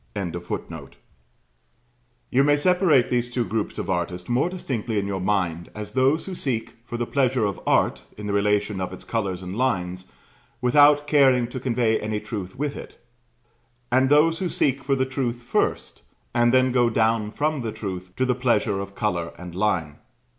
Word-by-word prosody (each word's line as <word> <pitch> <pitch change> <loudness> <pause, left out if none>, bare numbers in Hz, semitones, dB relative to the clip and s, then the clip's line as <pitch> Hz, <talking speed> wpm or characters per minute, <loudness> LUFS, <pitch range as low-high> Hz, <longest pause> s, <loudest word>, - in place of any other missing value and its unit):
] - - -37 2.2
You 135 +2 +4
may 145 +1 +4
separate 170 -5 +3
these 120 0 +1
two 120 -1 -1
groups 110 -1 -3
of - - -4
artists 90 -1 -2
more 125 +8 +1
distinctly 125 - -3
in 100 - 0
your 95 -2 -3
mind 90 -4 -1
as 105 -1 -6
those 130 +7 +2
who 190 - -6
seek 125 -9 -3
for 120 0 -6
the 120 - -1
pleasure 130 -3 +1
of 100 -2 -2
art, - - +2 0.2
in 105 - -7
the 100 - -2
relations 105 0 +1
of 90 0 -4
its 95 - -7
colours 95 -5 -2
and 90 +1 -6
lines, 95 -7 -1 0.5
without 145 +4 +5
caring 135 -4 +4
to 130 - -5
convey 120 -3 +1
any 105 0 -2
truth 100 -5 -6
with 145 +1 -2
it; - - -10 0.9
and 130 +1 +3
those 155 +3 +4
who 185 - -1
seek 135 -3 +1
for 135 0 +1
the 130 0 +1
truth 125 -3 -3
first, 120 - -1 0.3
and 120 0 +3
then 130 0 +4
go 120 -1 +3
down 110 -1 +1
from 150 +4 -1
the 115 -2 -3
truth 95 -4 -6
to 130 - +1
the 125 - +2
pleasure 115 -5 +1
of 100 0 -7
colour 90 -7 -2
and 90 -1 -9
line. 90 -6 -1
120 Hz, 180 wpm, -24 LUFS, 100-130 Hz, 2.2 s, without